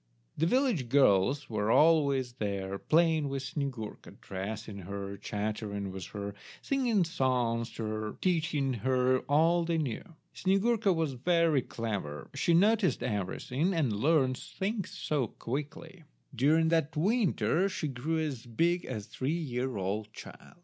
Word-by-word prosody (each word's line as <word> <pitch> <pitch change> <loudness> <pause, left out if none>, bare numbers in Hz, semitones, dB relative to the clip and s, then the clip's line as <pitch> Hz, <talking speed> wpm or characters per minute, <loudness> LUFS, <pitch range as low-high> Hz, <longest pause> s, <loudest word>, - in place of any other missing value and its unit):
The 160 - +1
village 235 - +1
girls 130 +1 +3
were 105 -1 -1
always 140 -4 +4
there 100 -4 -3
playing 160 -2 +2
with 135 -1 -3
Snyegurka, 130 -7 -5
dressing 100 +2 -6
her, 100 +1 -6
chattering 105 -1 -4
with 95 -2 -6
her, 100 -1 -5 0.3
singing 245 -8 +1
songs 125 -8 0
to 115 - -5
her, 110 0 -4
teaching 155 -6 +1
her 130 0 +2
all 165 +4 +4
they 165 0 0
knew. 140 -8 -2 0.3
Snyegurka 200 +2 +2
was 160 -5 0
very 165 +2 +2
clever; 100 - -5
she 165 +4 +2
noticed 205 +1 +3
everything, 125 - -1
and 140 -9 +1
learnt 130 +2 +2
things 200 0 -4 0.3
quickly. 150 +7 -5 0.3
During 155 +6 +3
that 160 -2 +1
winter 195 -1 +2
she 175 -4 -3
grew 140 +5 -2
as 140 -7 -3
big 170 +9 +1
as 110 -6 -5
a - - -24
three 140 +9 -2
year 130 -6 -3
old 105 +3 -3
child. - - -12
135 Hz, 135 wpm, -30 LUFS, 110-165 Hz, 0.3 s, always